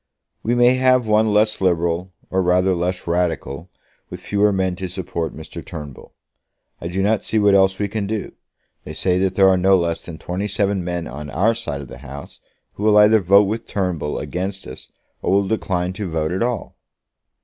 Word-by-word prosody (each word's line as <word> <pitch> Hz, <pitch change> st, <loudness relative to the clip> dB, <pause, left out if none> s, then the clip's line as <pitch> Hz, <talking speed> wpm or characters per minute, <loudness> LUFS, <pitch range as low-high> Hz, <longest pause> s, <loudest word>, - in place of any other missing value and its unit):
"We 120 Hz, +2 st, 0 dB
may 120 Hz, +1 st, +4 dB
have 130 Hz, -1 st, +3 dB
one 110 Hz, 0 st, +3 dB
less 105 Hz, 0 st, +2 dB
liberal, 85 Hz, 0 st, +1 dB, 0.2 s
or 95 Hz, -, +2 dB
rather 90 Hz, +1 st, +2 dB
less 90 Hz, +1 st, -2 dB
radical, 85 Hz, -2 st, -2 dB, 0.4 s
with -, -, -7 dB
fewer 105 Hz, 0 st, +1 dB
men 95 Hz, -2 st, 0 dB
to 95 Hz, -1 st, -4 dB
support 85 Hz, -2 st, -4 dB
Mr. 80 Hz, -, -9 dB
Turnbull. 75 Hz, -5 st, -10 dB, 0.6 s
I 85 Hz, -, -5 dB
do 95 Hz, +3 st, -1 dB
not 105 Hz, +1 st, +1 dB
see 110 Hz, -, -1 dB
what 105 Hz, -1 st, +4 dB
else 95 Hz, -1 st, +4 dB
we 105 Hz, -, -1 dB
can 105 Hz, 0 st, -3 dB
do. 110 Hz, -1 st, -3 dB, 0.5 s
They -, -, -8 dB
say 90 Hz, -1 st, 0 dB
that 95 Hz, 0 st, 0 dB
there 95 Hz, 0 st, +5 dB
are 95 Hz, -1 st, +4 dB
no 95 Hz, +1 st, +4 dB
less 85 Hz, -2 st, -1 dB
than 85 Hz, -2 st, -9 dB
twenty 90 Hz, +5 st, -4 dB
seven 100 Hz, -1 st, 0 dB
men 90 Hz, -1 st, -3 dB
on 75 Hz, 0 st, -7 dB
our 100 Hz, +11 st, +2 dB
side 70 Hz, -11 st, -5 dB
of 70 Hz, -, -9 dB
the -, -, -11 dB
House 70 Hz, +1 st, -10 dB, 0.3 s
who 105 Hz, -, -7 dB
will 105 Hz, -1 st, +5 dB
either 105 Hz, +1 st, +6 dB
vote 100 Hz, +2 st, +5 dB
with 110 Hz, +3 st, -3 dB
Turnbull 90 Hz, -6 st, -2 dB
against 95 Hz, +2 st, -4 dB
us, 65 Hz, -, -11 dB, 0.3 s
or -, -, -1 dB
will 100 Hz, 0 st, +2 dB
decline 90 Hz, -4 st, -1 dB
to 95 Hz, -1 st, -5 dB
vote 80 Hz, -1 st, -1 dB
at 95 Hz, -, -2 dB
all." 120 Hz, -3 st, -2 dB
95 Hz, 200 wpm, -20 LUFS, 85-105 Hz, 0.6 s, either